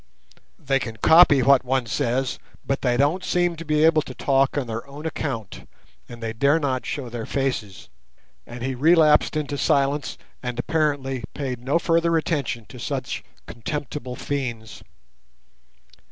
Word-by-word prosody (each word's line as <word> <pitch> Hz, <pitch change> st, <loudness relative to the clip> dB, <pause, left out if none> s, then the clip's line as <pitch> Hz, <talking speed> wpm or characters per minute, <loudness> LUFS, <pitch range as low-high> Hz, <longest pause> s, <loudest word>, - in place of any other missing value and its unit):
"They 135 Hz, -1 st, 0 dB
can 115 Hz, -3 st, -6 dB
copy 150 Hz, 0 st, +6 dB
what 135 Hz, -1 st, +5 dB
one 130 Hz, 0 st, 0 dB
says, 125 Hz, +2 st, -1 dB, 0.3 s
but 135 Hz, -, -1 dB
they 120 Hz, -2 st, +1 dB
don't 150 Hz, +8 st, +2 dB
seem 175 Hz, -1 st, +1 dB
to 165 Hz, -, -7 dB
be 150 Hz, -1 st, +1 dB
able 160 Hz, -1 st, +5 dB
to 130 Hz, -, -9 dB
talk 135 Hz, 0 st, +1 dB
on 140 Hz, -, 0 dB
their 115 Hz, -1 st, -5 dB
own 145 Hz, +3 st, -10 dB
account, 130 Hz, -, -5 dB, 0.4 s
and 120 Hz, -1 st, -10 dB
they 110 Hz, -1 st, -3 dB
dare 140 Hz, +7 st, +3 dB
not 130 Hz, -4 st, -2 dB
show 140 Hz, -4 st, -4 dB
their 115 Hz, -1 st, -6 dB
faces," 125 Hz, -8 st, -3 dB, 0.6 s
and 120 Hz, 0 st, -8 dB
he 135 Hz, +1 st, -1 dB
relapsed 155 Hz, +2 st, +4 dB
into 145 Hz, -2 st, -3 dB
silence, 140 Hz, +1 st, +1 dB, 0.2 s
and 125 Hz, -1 st, -4 dB
apparently 135 Hz, -3 st, -1 dB
paid 130 Hz, -4 st, -3 dB
no 140 Hz, +6 st, +2 dB
further 165 Hz, 0 st, +2 dB
attention 140 Hz, -8 st, -2 dB
to 125 Hz, -, -11 dB
such 135 Hz, -1 st, -4 dB, 0.2 s
contemptible 130 Hz, +1 st, -5 dB
fiends. 120 Hz, -7 st, -4 dB
135 Hz, 155 wpm, -23 LUFS, 125-150 Hz, 0.6 s, copy